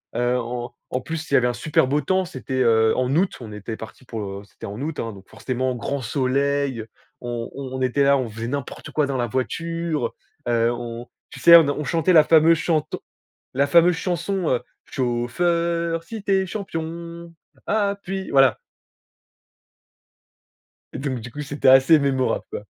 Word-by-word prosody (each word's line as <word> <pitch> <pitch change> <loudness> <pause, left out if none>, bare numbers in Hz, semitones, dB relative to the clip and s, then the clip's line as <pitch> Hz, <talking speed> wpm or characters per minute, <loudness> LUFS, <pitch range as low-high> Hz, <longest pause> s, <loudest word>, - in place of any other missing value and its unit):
Heu, 120 +1 +1
en 120 0 -5 0.2
en 130 - -2
plus, 160 +2 -5
il - - -5
y - - +7
avait 125 -1 +3
un 120 - 0
super 135 +1 +1
beau 145 +2 +1
temps, 185 +6 +1
c'était, 130 - -7
heu, 110 -2 +4
en 130 +1 0
août, 185 +3 +2
on 110 -2 -8
était 105 +2 -6
parti 110 +3 -11
pour, 115 -3 -5
heu, 100 0 -6
c'était 115 - -12
en 105 +3 -7
août, 155 +1 -4
hein 115 - -3
donc 95 -1 -15
forcément 130 0 -2
grand 130 +4 -3
soleil, 140 0 0 0.4
on 120 -1 -4
on 130 -1 -6
était 130 +3 +1
là, 140 0 +5
on 130 -3 -2
faisait 115 +2 -6
n'importe 140 +1 -5
quoi 150 -2 +1
dans 135 -2 -2
la 120 -1 0
voiture, 155 +3 -2 0.3
heu, 115 0 +2
on 120 0 -6 0.2
tu - - -11
sais 170 0 +9
on - - +8
n 140 - -1
on 150 - -3
chantait 170 +4 +1
la 155 -2 +8
fameuse 165 +1 +5
chanson 155 -3 -1 0.5
la 140 +1 +3
fameuse 170 +3 +5
chanson, 180 0 -2
heu: 125 -1 +1 0.2
«Chauffeur 165 +7 -1
si 220 +4 -7
tu 200 - -2
es 190 0 +2
champion, 170 -3 -6 0.3
appuie». 200 -2 -1
Voilà 135 -1 +5 2.4
et - - -5
donc 135 -3 -3
du 115 +2 -9
coup, 150 - -6
c'était 145 -1 -2
assez 135 +4 +7
mémorable, 135 -2 0
quoi. - - -7
140 Hz, 180 wpm, -23 LUFS, 120-165 Hz, 2.4 s, sais